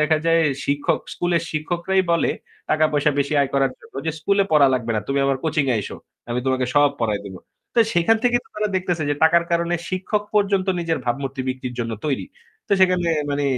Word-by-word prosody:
দেখা 155 +1 +3
যায় 165 0 +4 0.2
শিক্ষক 145 0 0
স্কুলের 175 -2 0
শিক্ষকরাই 175 +4 0
বলে 170 - +2 0.4
টাকা-পয়সা 155 -1 +2
বেশি 140 +1 0
আয় 140 -1 0
করার 135 -1 +2
জন্য - - -19
ওইযে, 160 +2 -2
"স্কুলে 200 +4 +2
পড়া 150 -2 +6
লাগবে 120 -2 -2
না। - - 0
তুমি 140 0 0
আমার 135 -1 +1
কোচিং 155 -2 +1
এ - - +2
আইসো। 105 - -4 0.3
আমি 120 +1 -1
তোমাকে 130 -1 +1
সব 145 0 +6
পড়ায় 105 -3 0
দিবো।" 95 -2 -8 0.4
তো 235 - +5
সেখান 175 +7 +4
থেকেই 245 -1 +3
তো - - -25
তারা 210 0 0
দেখতেছে 180 -3 -1
যে - - +2
টাকার 170 +1 +5
কারণে 170 +1 +1
শিক্ষক 190 +3 -1
পর্যন্ত 200 -2 +2
নিজের 165 -1 -1
ভাবমূর্তি 135 +2 -2
বিক্রির 130 -1 -4
জন্য 115 -1 -3
তৈরি। 140 - -1 0.4
তো - - 0
সেখানে 180 -2 +3 0.2
মানি 145 0 -1
155 Hz, 200 wpm, -22 LUFS, 135-175 Hz, 0.4 s, পড়া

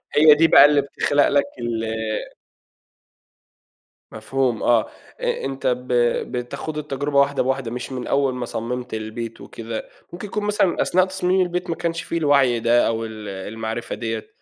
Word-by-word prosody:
هي 150 +1 +8
دي 165 +2 +4
بقى 150 - +8
اللي 145 -1 +4
بتخلق 145 +1 +1
لك 140 0 +2
ال 115 -1 -2 2.3
مفهوم 120 +1 -1
آه، 120 -2 +4 0.4
أ - - -2
أنت 135 0 -3
ب 125 0 -1 0.5
بتخوض 135 +5 -5
التجربة 145 -1 -1
واحدة 140 -1 +2
بواحدة، 130 -2 -2
مش 125 +2 -5
من 125 -2 -5
أوّل 140 -2 +1
ما 125 -1 -3
صمّمت 125 +1 -5
البيت 110 +1 -5
وكده، 115 -1 -7 0.2
ممكن 185 +4 -6
يكون 210 +1 -3
مثلًا 205 -3 +1
أثناء 185 +1 +3
تصميم 190 0 0
البيت 180 0 -2
ما 165 - -1
كانش 165 0 -2
في 170 - -3
الوعي 140 -6 +3
ده، 120 +1 +3
أو 115 0 -1
ال 110 -1 -8
المعرفة 110 +4 -5
دِيَّة، 115 -2 -4
130 Hz, 160 wpm, -22 LUFS, 115-150 Hz, 2.3 s, هي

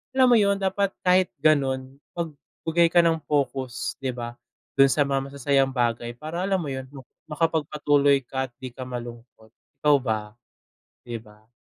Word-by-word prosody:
alam 255 -2 +5
mo 235 - +7
yun, 200 -1 +3
dapat 195 0 -1
kahit 185 0 +4 0.2
ganon, 135 -3 +1 0.2
magbigay 165 +1 -1
ka 170 0 +4
ng 165 -1 +2
pokus 130 -4 -2
'di 130 -2 -3
ba 120 -1 -5 0.5
dun 135 - +8
sa 140 +3 +3
mga 135 -1 -1
masasayang 135 -1 +1
bagay 120 -1 -1
para 155 +6 -6
alam 195 +1 +1
mo 145 - -4
yun 130 0 -5 0.4
makapagpatuloy 145 -3 +2
ka 130 +2 -3
at - - -27
di 130 - -5
ka 130 +1 -8
malungkot. 120 -2 -9 0.3
Ikaw 145 -2 +5
ba? 110 -4 -1 0.8
'Di 120 -1 -4
ba. 105 0 -20
140 Hz, 160 wpm, -25 LUFS, 125-160 Hz, 0.8 s, dun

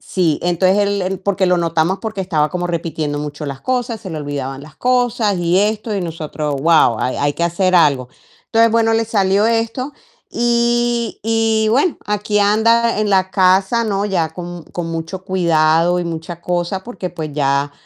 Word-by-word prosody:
Sí, 170 -5 0
entonces 185 +3 +2
él 200 -1 +1
él, 190 +1 -2
porque 195 0 0
lo 180 0 +3
notamos 165 +2 0
porque 220 -3 -4
estaba 155 -5 0
como 175 -1 -2
repitiendo 160 -3 -3
mucho 150 +1 -6
las 135 -1 -6
cosas, 245 -3 -2
se 200 - -8
le 160 - -5
olvidaban 140 -2 -5
las 155 +1 -14
cosas 245 -5 +1
y 175 +1 +2
esto, 215 +2 0
y - - -1
nosotros: 155 -3 -4
"Guau", 155 -8 +4
hay 130 - -1
hay 145 0 0
que - - -3
hacer 185 +2 +1
algo. 140 -7 +3 0.4
Entonces 230 0 +3
bueno, 225 -1 +3
le 225 - +1
salió 200 -1 +2
esto, 230 +4 -1 0.4
y 240 0 0
y 225 -1 +1
bueno, 285 +9 +2
aquí 210 0 0
anda 220 +2 +3
en 210 -1 0
la 190 -1 +2
casa, 190 +4 +3
¿no? 200 -2 -1
Ya 180 -6 0
con 175 -1 -7
con 175 -2 -4
mucho 165 +3 -5
cuidado 170 -2 +2
y 175 - -2
mucha 170 0 -6
cosa, 180 +2 -2
porque, 195 -6 -6
pues, 155 -2 -6
ya 140 0 0
185 Hz, 180 wpm, -18 LUFS, 165-220 Hz, 0.4 s, Guau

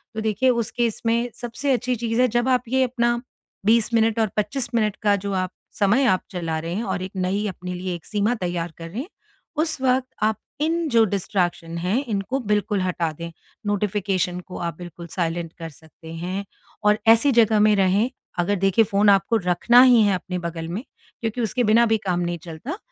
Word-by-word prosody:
तो 220 - -2
देखिए 220 +4 +1
उस 235 -2 0
केस 235 -3 -1
में 235 +2 +1
सबसे 245 +4 -3
अच्छी 250 0 0
चीज़ 230 +1 0
है 255 - +5
जब 240 +3 +1
आप 250 -1 +2
ये 260 +1 +3
अपना 240 -1 0 0.4
20 230 +1 +3
मिनट 225 0 +2
और 220 - +3
25 235 +4 -1
मिनट 215 -3 +1
का 205 -1 +4
जो 200 0 -4
आप 185 -1 -1 0.3
समय 215 +7 +3
आप 185 -5 +3
चला 165 -4 -3
रहे 165 +2 -4
हैं 220 - -2
और 190 -3 -2
एक 185 - -6
नई 190 +3 -1
अपने 180 -1 -6
लिए 180 0 -4
एक 170 - -11
सीमा 210 +2 0
तैयार 175 -4 -3
करें, 170 - -6 0.5
उस 315 -1 -1
वक़्त 260 0 +2 0.2
आप 215 -1 +2 0.2
इन 330 +2 +1
जो 230 -3 +5
डिस्ट्रैक्शन 175 -4 -2
हैं 185 +10 0
इनको 210 +6 -1
बिल्कुल 210 -3 0
हटा 175 -3 -1
दें। 170 +2 -7 0.4
नोटिफ़िकेशन 195 -3 0
को 180 0 -9
आप 170 -2 -4
बिल्कुल 175 -1 -9
साइलेंट 170 -1 -2
कर 165 -1 -6
सकते 160 +1 -14
हैं 180 +4 -4 0.4
और 210 +1 +4
ऐसी 230 +5 +6
जगह 225 -2 +4
में 210 0 +5
रहें, 195 +4 +2 0.3
अगर 175 +4 +1
देखें 195 +3 +3
फ़ोन 205 0 +3
आपको 200 +3 +4
रखना 235 +7 +5
ही 245 -3 +6
है 200 -2 +3
अपने 180 0 -4
बगल 170 -1 -5
में, 195 +8 -4 0.4
क्योंकि 225 +1 -2
उसके 240 +2 0
बिना 230 +2 +5
भी 220 -1 +2
काम 180 -1 +1
नहीं 175 0 -2
चलता। 175 - -6
205 Hz, 200 wpm, -23 LUFS, 180-235 Hz, 0.5 s, ऐसी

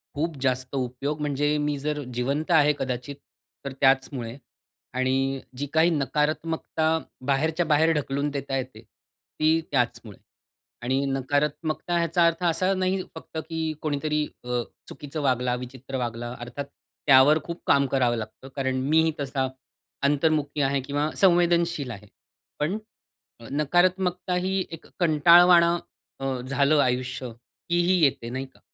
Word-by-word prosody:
खूप 160 +2 -2
जास्त 130 0 -1
उपयोग, 135 +4 -3
म्हणजे 145 +1 0
मी 145 -1 -1
जर 150 -1 -1 0.2
जिवंत 140 +7 -1
आहे 150 0 +5
कदाचित 130 +1 -3 0.5
तर 140 - -3
त्याचमुळे. 135 -3 +1 0.6
आणि 135 +1 0 0.2
जी 145 - -2
काही 160 +2 +5
नकारात्मकता 155 +2 -1 0.4
बाहेरच्या, 160 +5 +1
बाहेर 155 +1 +3
ढकलून 140 -1 -1
देता 140 -1 -3
येते, 130 -4 -6 0.6
ती 155 +1 +4
त्याचमुळे 120 -6 -1 0.7
आणि 130 +3 0
नकारात्मकता 145 +5 -1
ह्याचा 170 0 +3
अर्थ 165 +1 0
असा 185 +3 +2
नाही 185 0 0
फक्त 160 0 -8
की 160 -1 -2
कोणीतरी 150 0 0 0.2
अ, 125 0 -1 0.3
चुकीचं 145 +2 -7
वागला, 125 -2 +1
विचित्र 130 +2 -7
वागला 120 -1 -4
अर्थात 125 +4 -6 0.4
त्यावर 135 +3 +7
खूप 170 0 -7
काम 140 0 +4
करावं 125 -3 +1
लागतं. 110 +4 -8
कारण 130 -1 -1
मीही 160 +1 +4
तसा 135 -1 -1 0.6
अंतर्मुखी 150 0 +1
आहे 140 0 +1
किंवा 145 +3 -1
संवेदनशील 170 -5 +3
आहे. 105 -3 -9 0.5
पण 165 +8 -1 0.7
नकारात्मकता 180 +5 +1
ही 190 0 0
एक 165 - -9
कंटाळवाण 170 +2 +7 0.6
अ, 135 -2 -2
झालं 140 +3 +3
आयुष्य 125 0 -2 0.4
की 175 0 +3
ही 185 0 +3
येते 130 -4 0
नाही 130 +2 -4
का? 130 - -25
145 Hz, 130 wpm, -25 LUFS, 130-160 Hz, 0.7 s, त्यावर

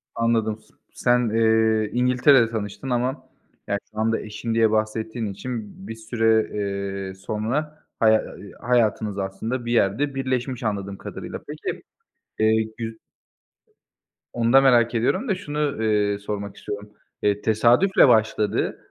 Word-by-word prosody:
Anladım. 115 -2 0
S - - -27 0.2
sen, 120 -1 +2
eee, 110 -1 +2
İngiltere'de 125 0 +4
tanıştın 105 +2 -5
ama 125 +3 -2 0.4
ya, 100 - 0
şu 110 - -8
anda 115 +1 +1
eşin 110 +2 -5
diye 115 -1 +3
bahsettiğin 110 +1 -1
için 105 -2 -7
bir 115 - -6
süre, 110 -1 +1
eee, 100 -1 -3
sonra 120 +11 -3 0.2
haya 110 -1 +4 0.4
hayatınız 110 -4 +1
aslında 105 +6 -3
bir 120 - -2
yerde 120 +6 +1
birleşmiş 130 -2 -2
anladığım 100 -2 -3
kadarıyla. - - -7
Peki, - - -5 0.6
eee, 110 0 +3
gü 115 -1 -6 1.3
Onu 115 0 +1
da 135 - +8
merak 120 -3 +4
ediyorum 185 - +1
da 200 - +1
şunu, 150 -7 -2
eee, 105 -2 +1
sormak 100 0 -5
istiyorum. 105 0 -7 0.3
Eee, 105 0 +1
tesadüfle 120 - +4
başladı. 110 -3 +2
110 Hz, 130 wpm, -23 LUFS, 105-120 Hz, 1.3 s, da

